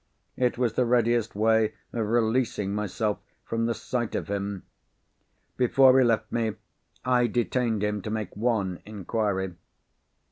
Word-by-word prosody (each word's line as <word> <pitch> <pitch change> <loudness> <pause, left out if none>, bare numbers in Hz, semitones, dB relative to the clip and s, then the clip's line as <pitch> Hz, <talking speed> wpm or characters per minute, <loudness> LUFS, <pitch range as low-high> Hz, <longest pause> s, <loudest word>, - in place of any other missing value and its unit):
It 125 -1 +1
was 120 -3 +1
the 125 - +2
readiest 120 -2 +2
way 110 0 +2 0.2
of 115 -3 -1
releasing 110 -3 +1
myself 105 0 -1 0.3
from 115 0 -1
the 115 - 0
sight 120 -3 -3
of - - -3
him. 100 -1 -3 0.9
Before 130 +1 +5
he - - +6
left 115 -2 +1
me, 115 -3 -1 0.5
I 125 -1 +3
detained 120 -2 0
him 105 -1 -1
to 105 - -5
make 110 -1 -4
one 105 -5 0
inquiry. 100 -2 -2
110 Hz, 140 wpm, -27 LUFS, 105-120 Hz, 0.9 s, he